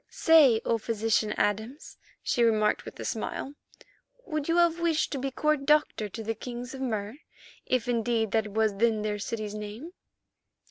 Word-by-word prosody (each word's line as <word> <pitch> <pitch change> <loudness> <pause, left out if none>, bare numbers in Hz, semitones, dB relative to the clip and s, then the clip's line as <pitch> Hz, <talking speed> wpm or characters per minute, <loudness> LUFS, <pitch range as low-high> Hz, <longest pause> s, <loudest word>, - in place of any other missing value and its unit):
"Say, 295 -9 +5
O 230 - +1
Physician 220 -1 0
Adams," 220 +8 -2 0.2
she 240 - 0
remarked 215 -2 +2
with - - -10
a - - -5
smile, 275 - -4 0.7
"would 305 -6 -3
you 335 +1 +2
have 340 -1 +3
wished 335 -2 +1
to 275 - -2
be 270 +1 -2
court 300 +1 0
doctor 300 -8 +2
to 225 +3 -7
the 225 +1 -2
kings 245 +3 -7
of 265 - -7
Mur, 220 -1 -3 0.5
if 255 -2 0
indeed 230 -2 0
that 220 -1 +1
was 215 -1 0
then 220 -1 +2
their 210 -1 -2
city's 215 0 -4
name?" 210 +9 -7
230 Hz, 170 wpm, -28 LUFS, 215-275 Hz, 0.7 s, Say